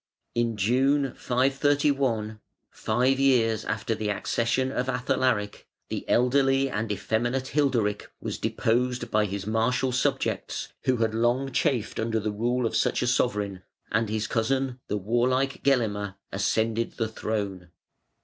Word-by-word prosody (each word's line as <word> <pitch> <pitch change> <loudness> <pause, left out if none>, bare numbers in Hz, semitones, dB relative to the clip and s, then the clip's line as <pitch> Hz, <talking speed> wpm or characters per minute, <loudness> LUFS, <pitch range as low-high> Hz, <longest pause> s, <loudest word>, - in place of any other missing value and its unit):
In 115 -2 0
June, 135 +6 +2
531, 135 -4 +1 0.3
five 125 +4 +1
years 115 -5 +3
after 110 +1 -1
the 110 -1 -2
accession 120 +5 0
of 130 -1 -2
Athalaric, 125 -4 0 0.2
the - - -5
elderly 135 +2 +3
and 105 +1 -2
effeminate 120 +6 -1
Hilderic 125 -8 0
was - - -4
deposed 120 +1 0
by 105 0 +3
his 100 -1 -4
martial 125 +4 +1
subjects 125 - -1 0.2
who 130 -1 +2
had 110 -1 0
long 120 +4 +1
chafed 125 -2 0
under 115 0 0
the 105 0 -2
rule 120 +4 0
of 115 - -1
such - - +1
a - - +1
sovereign, 105 -6 0 0.3
and 110 0 +1
his 110 0 -1
cousin, 130 +3 0
the 105 - -1
warlike 125 +6 0
Gelimer, 105 -7 +1 0.2
ascended 110 +3 0
the 115 - -1
throne. 100 -5 -4
120 Hz, 135 wpm, -26 LUFS, 110-130 Hz, 0.3 s, years